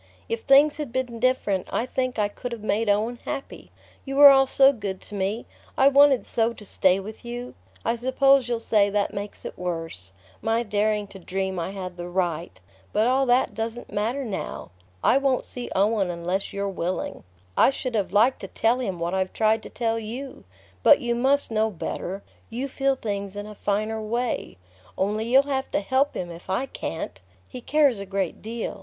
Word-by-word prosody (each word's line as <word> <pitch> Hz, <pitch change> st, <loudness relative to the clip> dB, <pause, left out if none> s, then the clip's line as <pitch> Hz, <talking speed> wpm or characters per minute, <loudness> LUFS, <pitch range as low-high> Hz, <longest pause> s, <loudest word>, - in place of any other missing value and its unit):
If 230 Hz, 0 st, -2 dB
things 285 Hz, +2 st, +5 dB
had 295 Hz, -5 st, -5 dB
been 250 Hz, -2 st, -3 dB
different 220 Hz, -6 st, 0 dB
I 235 Hz, -, 0 dB
think 255 Hz, -1 st, -2 dB
I 210 Hz, -1 st, +2 dB
could 245 Hz, +4 st, -7 dB
have 225 Hz, -3 st, -8 dB
made 215 Hz, +1 st, 0 dB
Owen 220 Hz, +4 st, +1 dB
happy. 275 Hz, -, -6 dB, 0.3 s
You 270 Hz, -1 st, -5 dB
were 285 Hz, 0 st, +10 dB
all 270 Hz, 0 st, +5 dB
so 270 Hz, +1 st, +5 dB
good 200 Hz, -6 st, -5 dB
to -, -, -11 dB
me 200 Hz, +3 st, -2 dB, 0.3 s
I 270 Hz, +1 st, +6 dB
wanted 280 Hz, -2 st, +5 dB
so 230 Hz, 0 st, +1 dB
to 215 Hz, -, -12 dB
stay 190 Hz, -1 st, +2 dB
with 215 Hz, +5 st, -9 dB
you! 240 Hz, +1 st, -6 dB, 0.3 s
I 235 Hz, -, +1 dB
suppose 260 Hz, +1 st, +3 dB
you'll 235 Hz, -1 st, 0 dB
say 210 Hz, -3 st, +3 dB
that 200 Hz, 0 st, 0 dB
makes 205 Hz, +1 st, -6 dB
it -, -, -7 dB
worse: 165 Hz, -, -5 dB, 0.3 s
my 225 Hz, +2 st, +1 dB
daring 210 Hz, -1 st, 0 dB
to 195 Hz, -, -11 dB
dream 190 Hz, +1 st, -3 dB
I 170 Hz, -, -2 dB
had 185 Hz, -2 st, -7 dB
the 175 Hz, 0 st, -6 dB
right...But 165 Hz, -, -2 dB
all 260 Hz, +2 st, +2 dB
that 245 Hz, +1 st, +3 dB
doesn't 225 Hz, +2 st, -5 dB
matter 235 Hz, +7 st, -1 dB
now. 200 Hz, -, -5 dB, 0.3 s
I -, -, +5 dB
won't 275 Hz, -2 st, +1 dB
see 245 Hz, -1 st, -6 dB
Owen 200 Hz, -1 st, +2 dB
unless 175 Hz, +3 st, -2 dB
you're 200 Hz, 0 st, -2 dB
willing. 185 Hz, -1 st, -3 dB, 0.3 s
I -, -, +6 dB
should 260 Hz, -2 st, -3 dB
have 200 Hz, -5 st, -1 dB
liked 225 Hz, +6 st, +4 dB
to -, -, -7 dB
tell 235 Hz, +3 st, +1 dB
him 190 Hz, -8 st, -3 dB
what 170 Hz, +2 st, -2 dB
I've 190 Hz, -1 st, -1 dB
tried 220 Hz, 0 st, +2 dB
to -, -, -10 dB
tell 230 Hz, -1 st, -1 dB
you; 245 Hz, -, -7 dB, 0.4 s
but -, -, +7 dB
you 240 Hz, -1 st, -1 dB
must 265 Hz, +3 st, +2 dB
know 220 Hz, 0 st, +2 dB
better; 195 Hz, 0 st, -5 dB, 0.3 s
you 250 Hz, +4 st, -3 dB
feel 270 Hz, 0 st, 0 dB
things 200 Hz, -5 st, -4 dB
in 205 Hz, 0 st, -5 dB
a 210 Hz, -, -9 dB
finer 215 Hz, +2 st, -1 dB
way. 235 Hz, -, -2 dB, 0.4 s
Only 210 Hz, +3 st, 0 dB
you'll 270 Hz, +2 st, +7 dB
have 270 Hz, -1 st, -2 dB
to -, -, 0 dB
help 260 Hz, +8 st, +1 dB
him 175 Hz, -1 st, -4 dB
if 170 Hz, +2 st, -12 dB
I 195 Hz, +8 st, 0 dB
can't. 130 Hz, -, -6 dB, 0.3 s
He 250 Hz, -, -9 dB
cares 280 Hz, -5 st, +3 dB
a 200 Hz, -, -6 dB
great 195 Hz, -3 st, -2 dB
deal 225 Hz, -2 st, -5 dB
220 Hz, 195 wpm, -25 LUFS, 195-255 Hz, 0.4 s, were